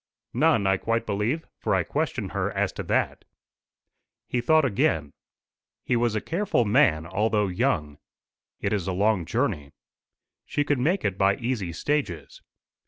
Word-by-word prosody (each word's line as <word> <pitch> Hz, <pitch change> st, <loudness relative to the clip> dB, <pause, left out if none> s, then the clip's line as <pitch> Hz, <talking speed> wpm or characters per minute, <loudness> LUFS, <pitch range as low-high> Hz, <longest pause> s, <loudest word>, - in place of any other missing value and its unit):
"None, 105 Hz, -3 st, +3 dB
I 95 Hz, 0 st, +3 dB
quite 115 Hz, +3 st, -1 dB
believe; 110 Hz, +10 st, -1 dB
for -, -, +1 dB
I -, -, +2 dB
questioned -, -, -2 dB
her -, -, -1 dB
as -, -, 0 dB
to -, -, -5 dB
that." -, -, 0 dB, 1.0 s
He 120 Hz, -, -1 dB
thought 155 Hz, +4 st, +4 dB
again. 80 Hz, -, 0 dB, 0.7 s
He 125 Hz, -, 0 dB
was 120 Hz, -2 st, +1 dB
a 110 Hz, -, 0 dB
careful 185 Hz, -, 0 dB
man, 105 Hz, -, +3 dB
although 105 Hz, +3 st, +1 dB
young. 90 Hz, -, -1 dB, 0.6 s
"It 100 Hz, -, -1 dB
is 95 Hz, -4 st, -1 dB
a 95 Hz, -, -1 dB
long 100 Hz, -1 st, +1 dB
journey." 90 Hz, -, -2 dB, 0.7 s
"She 145 Hz, -, -1 dB
could 145 Hz, -2 st, 0 dB
make 170 Hz, +10 st, +1 dB
it 100 Hz, -2 st, -1 dB
by 100 Hz, 0 st, +4 dB
easy 115 Hz, -7 st, -2 dB
stages." 95 Hz, -, -3 dB
105 Hz, 155 wpm, -26 LUFS, 95-125 Hz, 1.0 s, thought